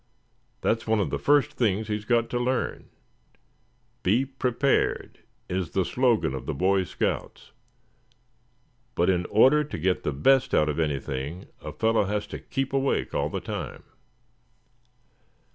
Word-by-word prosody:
That's 115 0 0
one 110 -1 +2
of 100 - -1
the - - -1
first 145 0 +3
things 110 -5 0
he's 105 -1 -3
got 115 0 +2
to 120 - 0
learn. 125 +1 -2 1.1
'Be 115 +9 +2
prepared' 135 0 0 0.3
is 90 -2 -2
the 95 -2 +1
slogan 120 - +1
of 65 - -6
the - - -2
Boy 95 +4 +2
Scouts; - - -3 1.4
but 90 +2 +3
in 90 -1 -1
order 135 +8 +5
to 150 - -6
get 95 0 0
the - - -1
best 130 - +3
out 75 - +3
of 75 - -2
anything, 75 +2 -3
a - - -6
fellow 110 -2 +1
has 105 +1 -2
to - - -4
keep 135 0 -3
awake 135 0 0
all - - 0
the - - -3
time." - - -6
105 Hz, 145 wpm, -26 LUFS, 90-130 Hz, 1.4 s, order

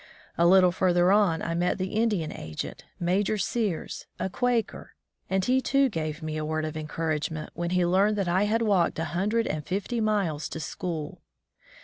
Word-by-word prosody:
A 170 - +4
little 185 0 +6
further 180 0 +3
on 195 -6 +3
I 165 - -2
met 175 +1 0
the 185 0 -3
Indian 210 -8 +1
agent, 75 0 -6
Major 190 +5 +1
Sears, 200 -3 -2
a 190 - -2
Quaker, 245 0 -1 0.3
and 190 0 +1
he, 260 +1 +3
too, 275 0 +3
gave 155 -4 -4
me 155 0 -3
a 155 - -2
word 155 0 -1
of 155 0 -5
encouragement 155 0 -3
when 170 +1 -3
he 180 0 +2
learned 195 +4 +3
that 200 -3 -1
I 185 +4 +2
had 225 +2 +1
walked 195 -6 +2
a 160 - -1
hundred 210 +6 +1
and 155 -1 -3
fifty 205 - -2
miles 195 -9 0
to - - -5
school. 165 +1 -5
180 Hz, 185 wpm, -27 LUFS, 160-205 Hz, 0.3 s, little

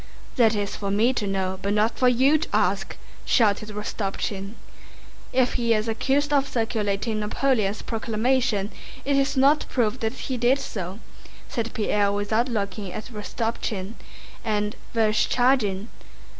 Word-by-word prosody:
"That 225 -4 +4
is 205 -1 -2
for 200 - -3
me 220 +6 +3
to 210 -5 -2
know, 190 -1 -1
but 200 +1 0
not 215 +2 +2
for 255 - +5
you 265 +5 +4
to - - -4
ask," - - 0 0.3
shouted 215 -2 +2
Rostopchín. 205 -1 -4 0.8
"If 255 -1 +2
he 230 -1 +3
is 215 +1 -1
accused 275 +6 +1
of 280 -1 +3
circulating 220 -2 -1
Napoleon's 215 -1 0
proclamation 225 -2 0 0.3
it 280 0 +2
is 275 0 +1
not 280 +3 +4
proved 245 0 0
that 220 0 -1
he 260 - -4
did 245 +3 +3
so," 190 -8 -5 0.5
said 230 -1 -3
Pierre 205 -2 +2
without 215 +5 0
looking 200 -3 -3
at 215 +6 -7
Rostopchín, 210 -2 -3 0.5
"and 210 -1 -1 0.2
Vereshchágin..." 220 -1 +2
220 Hz, 140 wpm, -25 LUFS, 205-250 Hz, 0.8 s, for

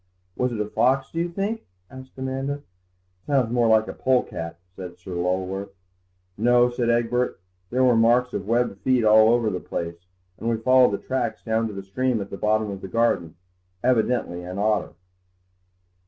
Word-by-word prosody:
"Was 125 0 0
it 115 - -4
a 105 - 0
fox, 130 +5 +1
do 165 - -3
you 170 +1 0
think?" 200 +6 -3 0.3
asked 130 0 -12
Amanda. 135 +2 -3 0.6
"Sounds 130 -5 +2
more 120 -1 +2
like 110 0 +4
a - - -5
polecat," 85 -10 -1 0.2
said 90 -1 -8
Sir 90 +1 -10
Lulworth. 95 +3 -2 0.6
"No," 120 +2 +4
said 120 -1 -1
Egbert, 120 0 +1 0.3
"there 130 +2 +1
were 125 -2 +5
marks 120 +2 +3
of 100 -1 -4
webbed 115 -3 0
feet 125 -3 +2
all 110 +1 +7
over 115 -2 +2
the 90 - -3
place, 85 +1 -6 0.3
and 115 - -2
we 115 - +1
followed 130 0 +4
the - - 0
tracks 120 -3 -3
down 110 0 0
to 110 - -7
the 100 - -6
stream 125 +4 -1
at 100 -1 -6
the - - -4
bottom 105 0 +1
of 95 -1 -7
the - - -6
garden; 90 -6 0 0.5
evidently 120 -7 +1
an 90 +2 -7
otter." 105 +1 0
115 Hz, 180 wpm, -24 LUFS, 100-125 Hz, 0.6 s, all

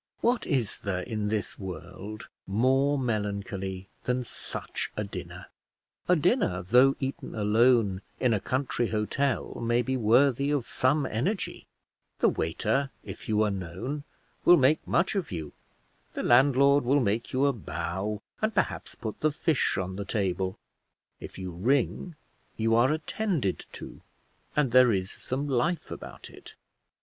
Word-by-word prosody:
What 240 +1 +1
is 130 - 0
there 95 -2 -2
in 105 -1 -3
this 105 0 -2
world 95 +3 -7 0.2
more 130 +8 +2
melancholy 100 -5 -3 0.2
than 125 0 0
such - - -5
a 105 - 0
dinner? 90 -2 -7 0.6
A 180 - +5
dinner, 165 - +1
though 125 +8 +5
eaten 135 0 -4
alone, 110 -2 +3 0.2
in 125 -3 +3
a 105 - +1
country 130 0 -1
hotel 115 +5 -1
may 120 +1 +2
be 130 +2 -1
worthy 130 +4 +3
of 145 -5 0
some 135 +3 +1
energy; 165 - -2 0.5
the - - +4
waiter, 110 - 0
if 100 +2 -9
you 110 0 +3
are 105 - +1
known, 95 - -4 0.4
will 175 - +8
make 140 +3 +3
much 175 +2 +2
of 195 - -2
you; 80 -5 -5 0.6
the - - -3
landlord 140 +3 +5
will 135 +4 +3
make 115 -1 0
you 130 +2 +2
a 140 - +3
bow 100 - -4 0.2
and 215 -1 0
perhaps - - -1
put 110 -2 -6
the 155 - +2
fish 155 -1 +1
on 95 0 -3
the 100 - -3
table; 95 -2 -1 0.6
if - - -9
you 95 -1 -5
ring 130 - 0 0.4
you 115 0 +2
are 120 +4 +4
attended 155 - -1
to, - - -9 0.5
and 145 -5 +2
there 125 -1 +7
is 95 -2 -1
some 135 +3 -4
life 145 +6 0
about - - -8
it. - - -13
120 Hz, 150 wpm, -28 LUFS, 100-140 Hz, 0.6 s, will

